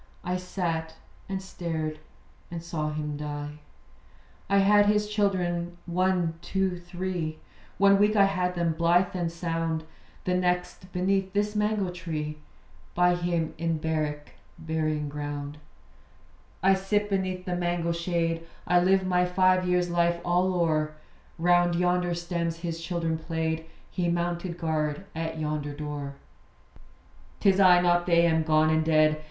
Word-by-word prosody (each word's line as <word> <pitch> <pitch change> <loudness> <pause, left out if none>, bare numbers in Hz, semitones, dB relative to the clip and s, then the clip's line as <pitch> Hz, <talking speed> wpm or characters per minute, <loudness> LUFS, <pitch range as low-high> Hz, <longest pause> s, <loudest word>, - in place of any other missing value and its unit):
I 180 +1 -1
sat, 170 -3 -3 0.3
and 190 -1 -3
stared, 160 -4 -4 0.5
and 170 -1 -6
saw 155 -3 -2
him 150 -1 -3
die. 150 0 -5 0.9
I 200 - +4
had 205 +1 +5
his 210 0 +2
children 175 -5 0
one, 180 -2 0
two, 190 -1 -1
three. 175 -2 -4 0.4
One 200 0 +5
week 210 +1 +4
I 200 -1 +6
had 180 -2 0
them, 170 -2 +1
blithe 170 +3 +2
and 170 -2 -1
sound. 165 -1 -2 0.4
The 180 - 0
next 180 0 -1
beneath 190 +1 0
this 205 +1 0
mango 210 -3 0
tree, 155 -4 -4 0.6
By 180 0 +4
him 175 -2 -1
in 165 -1 0
barrack 155 -2 -2 0.3
burying 155 -2 -1
ground. 145 0 -5 1.0
I 195 +1 +6
sit 205 +2 0
beneath 185 -2 -2
the 180 - -1
mango 175 -1 0
shade; 170 -1 -1 0.2
I 180 - +4
live 190 +1 +3
my 180 -1 +2
five 185 0 +3
years' 180 -1 +1
life 170 0 +2
all 180 +2 +2
o'er 155 -3 +1 0.4
Round 175 0 +3
yonder 180 0 +1
stems 170 -1 -2
his 165 -1 -4
children 165 -2 -2
played; 160 0 -2 0.2
He 175 -2 0
mounted 175 0 -2
guard 155 0 -1
at 160 0 -3
yonder 150 -2 -3
door. 145 -2 -5 1.2
'Tis 195 -2 +4
I, 180 -2 +7
not 175 0 +2
they, 170 -1 +5
am 160 -1 +3
gone 155 0 +3
and 160 0 +2
dead. 155 -1 +3
175 Hz, 140 wpm, -27 LUFS, 160-185 Hz, 1.2 s, I